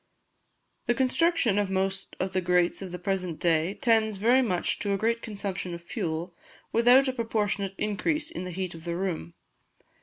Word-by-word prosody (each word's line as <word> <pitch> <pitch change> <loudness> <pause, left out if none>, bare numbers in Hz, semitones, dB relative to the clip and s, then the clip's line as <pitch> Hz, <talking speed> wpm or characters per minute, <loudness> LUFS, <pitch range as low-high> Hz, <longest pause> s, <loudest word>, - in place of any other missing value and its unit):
The 240 - +3
construction 260 - +2
of 205 -2 0
most 190 0 -1
of 190 +1 -2
the 185 - +1
grates 180 0 +2
of 190 -2 -6
the 180 - -4
present 180 -3 -2
day 170 +2 +2
tends 220 -3 +2
very 240 +6 +4
much 185 -8 0
to 200 -1 0
a - - -1
great 230 +3 0
consumption 195 -4 -4
of 170 - -10
fuel 170 +1 -3 0.4
without 245 +4 +5
a 260 - 0
proportionate 210 -5 -1
increase 300 +10 -1
in 335 - -5
the 180 - -5
heat 180 0 -4
of 165 -1 -11
the 170 0 -3
room. 170 - -3
195 Hz, 180 wpm, -27 LUFS, 180-230 Hz, 0.4 s, without